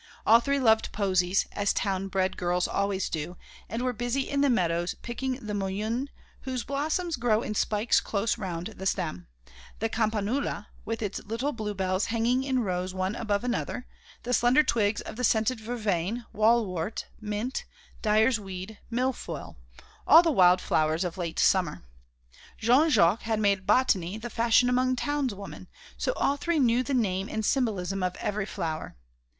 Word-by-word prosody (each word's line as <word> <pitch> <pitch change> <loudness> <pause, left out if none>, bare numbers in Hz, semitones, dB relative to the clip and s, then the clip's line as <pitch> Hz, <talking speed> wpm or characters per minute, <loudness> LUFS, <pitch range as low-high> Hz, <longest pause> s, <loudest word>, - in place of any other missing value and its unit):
All 230 +2 +7
three 280 +3 0
loved 220 -4 +3
posies, 185 -2 +1
as 205 -1 0
town 195 -1 -1
bred 190 -1 0
girls 180 0 0
always 200 -1 -1
do, 160 +3 -4 0.3
and 230 +3 -3
were 255 -1 0
busy 245 +3 -1
in 280 +1 -1
the 285 - +4
meadows 175 -6 +1
plucking 255 +1 -4
the 210 - -3
mullein, 210 +7 -2 0.3
whose 255 -2 -3
blossoms 310 +4 -1
grow 230 -1 +2
in 215 - -3
spikes 215 +2 +2
close 210 +2 -1
round 180 -6 -5
the 190 - -3
stem, 160 - -2 0.5
the 225 - -1
campanula, 220 +1 -1 0.2
with 225 0 -3
its 200 -2 -4
little 230 +7 -2
blue 210 -2 -4
bells 185 0 0
hanging 235 +3 +1
in 260 -2 0
rows 185 -1 -2
one 185 +3 -1
above 210 -3 -1
another, 245 0 -2 0.4
the 250 - -2
slender 250 +5 +5
twigs 215 -5 +1
of - - -8
the 250 - -3
scented 225 +1 +2
vervain, 220 -1 -2
wallwort, 215 -4 +1
mint, 215 +4 -3 0.4
dyer's 220 +2 +3
weed, 195 +1 -8
milfoil 255 +2 -3 0.5
all 325 +3 +9
the 330 - +2
wild 180 -7 +5
flowers 155 +1 +1
of 175 -1 -3
late 170 -2 -3
summer. - - +2 0.7
Jean 255 +8 +4
Jacques 185 - +4
had 225 -1 -1
made 200 -3 +1
botany 195 -7 +2
the 235 +2 -7
fashion 230 +2 +3
among 255 +1 +2
townswomen, 255 -8 -3 0.3
so - - -1
all 285 - +1
three 335 +3 0
knew 245 -3 +3
the 270 +2 -1
name 195 -4 0
and 220 -1 -2
symbolism 195 -8 0
of 180 0 -1
every 210 -1 -2
flower. 160 -6 -4
220 Hz, 165 wpm, -27 LUFS, 190-245 Hz, 0.7 s, all